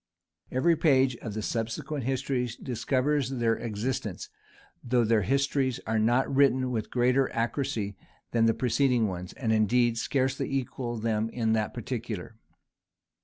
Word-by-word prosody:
Every 150 +7 +3
page 135 -5 +3
of 110 -2 -7
the 110 - -3
subsequent 115 +5 -3
histories 125 -2 -1
discovers 130 +3 0
their 120 -4 +1
existence; 110 -2 -3 0.5
though 120 0 +2
these 110 -4 +2
histories 140 -2 +1
are 110 0 0
not 120 +4 +3
written 130 -2 +3
with 110 -3 -2
greater 125 +2 +2
accuracy 115 -4 -1 0.4
than 115 -1 +3
the 115 - +3
preceding 125 -2 +2
ones, 90 -2 -5
and 110 -4 -1
indeed 115 +2 +3
scarcely 130 +1 0
equal 125 -2 -3
them 110 0 0
in 115 -2 0
that 110 -1 -1
particular. 115 -4 -5
120 Hz, 135 wpm, -28 LUFS, 110-130 Hz, 0.5 s, Every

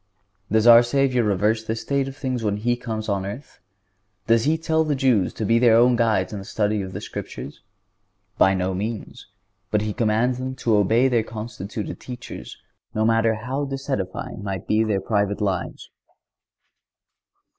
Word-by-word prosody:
Does 110 +1 +3
our 120 0 +9
Savior 125 0 +1
reverse 105 +2 +1
this 110 0 -3
state 140 -1 0
of 135 +1 -8
things 130 -4 -3
when 105 -1 0
He 120 +3 0
comes 110 -3 -5
on 100 -2 -1
earth? 105 +9 -8 0.7
Does 115 0 +3
He 155 +2 +2
tell 160 0 +1
the 150 -2 0
Jews 125 -8 +2
to 110 - -3
be 115 +2 +3
their 120 -2 +5
own 120 +1 +5
guides 110 -5 +1
in 105 - -4
the - - -8
study 105 0 0
of 95 -1 -6
the - - -5
Scriptures? - - -7 0.8
By 95 0 +5
no 95 0 -1
means; 105 +4 -5 0.4
but 105 - +1
He 105 -1 -2
commands 120 +2 +1
them 130 0 -4
to 115 -4 +1
obey 115 +6 +3
their 120 -3 +2
constituted 110 -2 -6
teachers, 125 -1 -9 0.4
no 110 0 +1
matter 115 0 +3
how 130 +6 -3
disedifying 135 -8 -4
might 95 -1 -4
be 110 +1 +3
their 105 -3 0
private 100 0 0
lives. 95 -4 -3
110 Hz, 170 wpm, -23 LUFS, 105-125 Hz, 0.8 s, our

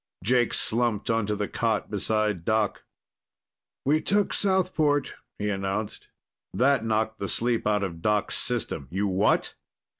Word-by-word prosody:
Jake 120 +3 +2
slumped 115 -2 0
onto 105 -2 0
the 105 0 -2
cot 110 -3 -1
beside 105 -3 0
Doc. 110 +1 0 1.0
"We 150 +3 +3
took 205 0 +1
Southport," 175 -7 +1 0.2
he 105 - -2
announced. 100 +1 -3 0.5
That 130 +4 +3
knocked 110 0 0
the 100 - -3
sleep 115 +1 0
out 105 -1 +2
of 85 -4 -5
Doc's 105 +1 +1
system. 115 - -2
"You 100 +3 -1
what?" 95 +2 +1
110 Hz, 130 wpm, -26 LUFS, 100-120 Hz, 1.0 s, We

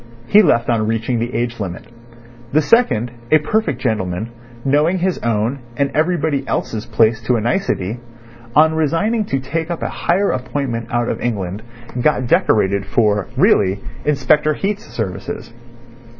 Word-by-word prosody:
He 205 - +6
left 120 - +2
on 110 -2 +1
reaching 115 +2 -1
the 120 +2 -2
age 120 0 -2
limit. 95 -4 -5 0.7
The 155 - +5
second, 145 - +3 0.2
a 155 - +6
perfect 215 +9 -1
gentleman, 105 -2 -2 0.3
knowing 150 +6 +3
his 185 0 0
own 115 +4 -1 0.2
and 140 -1 +1
everybody 155 -3 +1
else's 110 -1 -2
place 110 0 +2
to 120 +2 +1
a - - +1
nicety, 120 - -1 0.6
on 160 +2 +6
resigning 165 +9 +1
to 135 - -1
take 160 +5 -3
up 170 - -3
a - - -1
higher 195 +4 +1
appointment 125 -3 -3
out 120 0 0
of - - -3
England 100 -4 -2 0.4
got 130 -2 +2
decorated 100 -4 +2
for 105 -3 +1
(really) 95 0 +3 0.2
Inspector 150 +1 +2
Heat's 205 +5 -2
services. 110 +1 -5
125 Hz, 150 wpm, -18 LUFS, 110-155 Hz, 0.7 s, He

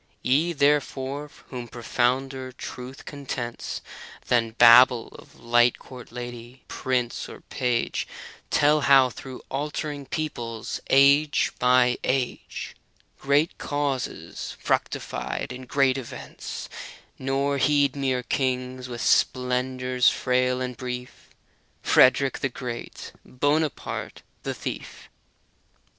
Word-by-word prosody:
Ye, 150 +7 +3
therefore, 145 -1 0 0.2
whom 125 -2 -6
profounder 130 +3 -1
truth 125 +1 -8
contents 130 -4 -5 0.5
Than 115 -2 +2
babble 120 0 +7
of - - -16
light 120 0 +3
court 125 -2 -12
lady, 120 +1 -8
prince 125 -2 -2
or - - -11
page, 125 -2 -1 0.4
Tell 150 +1 +4
how 135 -2 +6
through 130 0 -9
altering 145 0 -3
peoples, 120 -8 -4
age 140 +2 +5
by 125 0 +4
age, 130 -1 -2 0.4
Great 145 +4 +1
causes 145 -3 -3
fructified - - -2
in 130 0 -9
great 135 -1 +2
events, 125 - -7 0.5
Nor 135 +1 0
heed 145 0 +3
mere 130 -3 0
kings, 130 -1 -2
with 120 -1 -5
splendors 125 0 +2
frail 125 0 +1
and 125 -1 -3
brief, 125 +1 -7
â - - -34
Frederick 130 +1 +5
the 135 - 0
Greedy, 120 -1 -7
Bonaparte 145 +3 -2 0.2
the - - -4
Thief - - -7
130 Hz, 105 wpm, -25 LUFS, 125-140 Hz, 0.5 s, babble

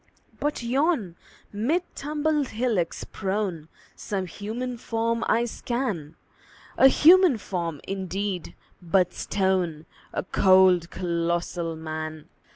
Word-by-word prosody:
But 295 -4 -2
yon, 245 - +1 0.4
mid 275 - +1
tumbled 300 0 -1
hillocks 220 -8 -1
prone, 190 -5 -3 0.3
Some 195 -2 -3
human 225 +7 -5
form 230 -1 -1
I 235 +1 +2
scan 230 - -3 0.6
A 265 - +7
human 335 +1 +6
form, 170 -7 -4
indeed, 190 -1 -3 0.3
but 180 +1 +2
stone: 185 -5 -1 0.3
A - - -2
cold, 185 -2 +4
colossal 170 -1 -2
Man! 155 -1 -6
195 Hz, 100 wpm, -25 LUFS, 170-240 Hz, 0.6 s, A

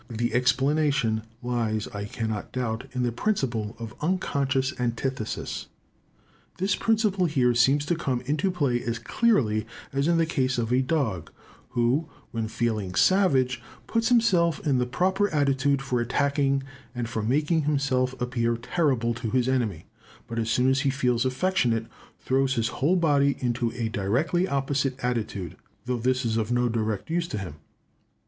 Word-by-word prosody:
The 115 0 -2
explanation 135 -2 +2 0.2
lies, 115 -3 -1
I 100 0 -5
cannot 110 -1 -4
doubt, 125 -2 -3
in 125 -1 -1
the 120 - +1
principle 120 - -1
of 115 -1 -7
unconscious 140 -6 0
antithesis. 120 -1 -3 0.9
This 190 +2 +1
principle 210 -5 +2
here 130 -6 +2
seems 135 +5 +3
to 175 - +1
come 130 -7 -1
into 150 +8 0
play 140 -9 0
as 115 0 -2
clearly 115 - +1 0.3
as 140 +2 +1
in 170 0 +3
the 165 - +3
case 130 -5 0
of 120 0 0
a 130 - +4
dog, 125 - -1 0.4
who, 125 +7 +1 0.2
when 115 -3 -2
feeling 110 -5 -2
savage, 130 - +3 0.2
puts 230 +1 0
himself 180 - +3
in 135 -4 +2
the 125 - 0
proper 190 +9 +1
attitude 140 -2 +1
for 125 -3 0
attacking 140 +2 +1 0.3
and 120 -1 -2
for 110 -1 -3
making 150 +7 +1
himself 130 -3 0
appear 120 -2 0
terrible 125 -2 0
to 115 -1 -4
his 125 +1 +1
enemy; 115 -11 -1 0.4
but 115 0 -4
as 115 0 -1
soon 125 +2 +2
as 135 - +2
he 140 - +1
feels 125 -2 +1
affectionate, 130 -6 +1 0.3
throws 135 0 +1
his 115 -2 0
whole 160 +7 +1
body 145 -5 +3
into 120 -2 -1
a 120 -2 -2
directly 130 - 0
opposite 135 -2 0
attitude, 105 -8 -2 0.3
though 125 0 -1
this 130 +1 +1
is 115 -1 0
of 110 +1 -1
no 120 0 +2
direct 110 +3 -2
use 170 0 0
to 110 - -4
him. 90 -7 -6
130 Hz, 160 wpm, -26 LUFS, 115-145 Hz, 0.9 s, a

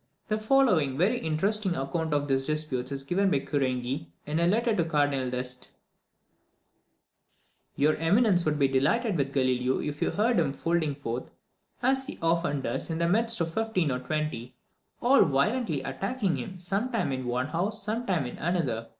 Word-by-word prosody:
The 215 0 0
following 215 - +3
very 210 - +2
interesting 190 +4 0
account 160 +3 -2
of 145 -1 +1
these 135 -1 +1
disputes 150 -4 -2
is 135 -1 -4
given 190 +7 +1
by 145 - +2
Querenghi, 130 - -2 0.2
in 150 +2 -1
a 170 - +3
letter 225 +4 +2
to 175 - +2
the 165 - -2
Cardinal 145 -4 +1
D'Este: 125 0 -3 2.1
"Your 150 +2 +3
eminence 180 +3 +3
would 155 -2 0
be 140 -2 +3
delighted 180 - +1
with 140 -3 0
Galileo 130 -1 +1
if 145 0 -4
you - - +2
heard 220 0 +2
him 140 -4 0
holding 165 -4 0
forth, 125 -3 -5 0.5
as 265 +1 +2
he - - -7
often 165 -4 +1
does, - - -3
in 160 - -2
the 170 0 +1
midst 225 +4 +2
of 165 0 -1
fifteen 220 -8 0
or 125 - -1
twenty, 130 -3 -3 0.5
all 260 +3 +6
violently 160 - 0
attacking 195 - -1
him, 130 +9 -6
sometimes 195 - -1
in 130 -1 -4
one 125 +3 -1
house, 195 +7 -2
sometimes 205 - -1
in - - -8
another. 140 -10 -1
160 Hz, 170 wpm, -28 LUFS, 135-200 Hz, 2.1 s, all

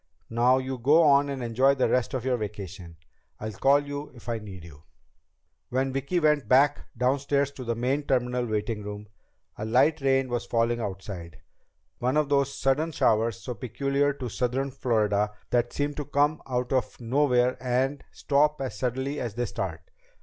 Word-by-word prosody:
Now 120 +3 +4
you 130 -1 -3
go 150 +7 +5
on 140 -1 +5
and 135 -2 -4
enjoy 130 +4 +3
the 130 - +2
rest 125 +1 0
of 125 -1 -3
your 130 -1 +2
vacation. 95 -6 -7 0.4
I'll 110 - -4
call 140 +7 +3
you 145 +1 -6
if 120 - -15
I 115 -1 -1
need 95 -5 -10
you." 75 -3 -13 0.9
When 130 +1 0
Vicki 140 +6 0
went 150 -6 +2
back 140 +4 +3
downstairs 140 +2 +1
to 135 -2 -8
the 120 -1 -2
main 135 +5 -1
terminal 125 -1 0
waiting 110 0 -2
room, 105 0 -7 0.5
a - - -3
light 135 +8 +3
rain 135 -1 +2
was 120 -1 -3
falling 115 0 +1
outside, 95 -4 -6 0.6
one 130 +4 +1
of 150 -2 +1
those 140 -1 +2
sudden 145 +5 0
showers 115 -6 +1
so 125 - -5
peculiar 140 +4 0
to 130 -2 -6
southern 130 +3 -1
Florida 105 -5 0 0.2
that 120 0 +1
seem 145 0 -1
to 145 0 -5
come 145 +2 +1
out 125 0 -1
of 130 -2 -1
nowhere 125 0 +2
and 130 +3 0
stop 150 +1 +1
as 135 -2 -4
suddenly 130 +3 -2
as 115 -4 -4
they 120 +1 -1
start. 90 -6 -4
125 Hz, 175 wpm, -27 LUFS, 115-140 Hz, 0.9 s, go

